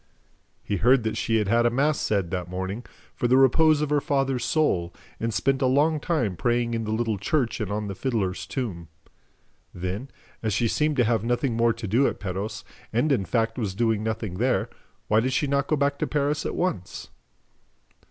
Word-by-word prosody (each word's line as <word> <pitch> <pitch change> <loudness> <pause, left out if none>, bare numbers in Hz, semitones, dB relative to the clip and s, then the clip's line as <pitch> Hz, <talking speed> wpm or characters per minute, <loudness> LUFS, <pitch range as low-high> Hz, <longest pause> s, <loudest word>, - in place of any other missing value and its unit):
He 100 - -2
heard 125 +5 +4
that 110 - -1
she 115 - 0
had 105 -2 0
had 115 +3 +3
a - - +4
mass 145 +5 +1
said, 100 -5 0
that 90 -2 -3
morning, 95 +5 -4 0.3
for 120 - -1
the 130 +2 +4
repose 150 +3 +5
of 150 -1 -1
her 145 -1 +3
father's 135 -3 0
soul 105 - +1 0.3
and 115 0 -1
spent 130 +5 +1
a 130 - +3
long 150 +4 +3
time 135 - -1
praying 120 +3 0
in 115 -1 -2
the 110 - -3
little 110 -2 -1
church 120 +2 0
and 105 -2 -3
on 105 +1 -2
the 100 - -4
fiddler's 100 -4 -2
tomb. 95 - -4 0.9
Then, 95 +9 -4 0.3
as 110 -3 -1
she 115 +1 +2
seemed 150 +5 0
to 125 - +5
have 115 -2 +1
nothing 120 +1 0
more 115 0 +3
to 115 0 -7
do 120 +8 +3
at - - -3
Perros 95 +2 -4 0.3
and, 125 +7 +1
in 115 -8 +1
fact, 115 +2 0
was 100 -5 -2
doing 110 -1 +1
nothing 110 -4 -3
there, 125 +2 +1 0.4
why 110 - +4
did 130 +3 0
she 145 - +1
not 140 0 0
go 155 - +2
back 140 0 0
to - - 0
Paris 150 +1 0
at - - -4
once? 175 - -3
115 Hz, 205 wpm, -25 LUFS, 105-135 Hz, 0.9 s, repose